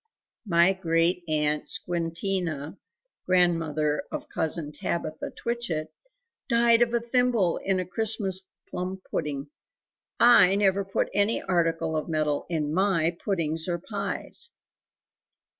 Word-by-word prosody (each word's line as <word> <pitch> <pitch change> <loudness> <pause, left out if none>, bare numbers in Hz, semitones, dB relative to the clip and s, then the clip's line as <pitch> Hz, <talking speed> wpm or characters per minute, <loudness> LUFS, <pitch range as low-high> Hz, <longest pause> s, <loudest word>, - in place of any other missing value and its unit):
"My 170 +1 +4
Great 170 -1 +1
aunt 150 -1 +1
Squintina 170 -2 -2 0.5
(grandmother 165 -4 +2
of - - -5
Cousin 160 -1 -1
Tabitha 155 0 -4
Twitchit) 170 -10 -4 0.6
died 235 -1 +4
of 240 -1 +3
a - - +3
thimble 235 -6 +1
in 195 -1 0
a 185 - -2
Christmas 200 -1 0 0.3
plum 185 +1 -4
pudding. 145 -1 -3 0.7
I 235 -6 +7
never 200 -1 +2
put 195 0 -1
any 205 +2 +2
article 165 -3 0
of 155 +2 -2
metal 155 -2 -1
in 155 -3 -1
MY 175 -3 +2
puddings 165 -4 -1
or 175 -1 0
pies." 470 - -4
175 Hz, 115 wpm, -26 LUFS, 160-195 Hz, 0.7 s, I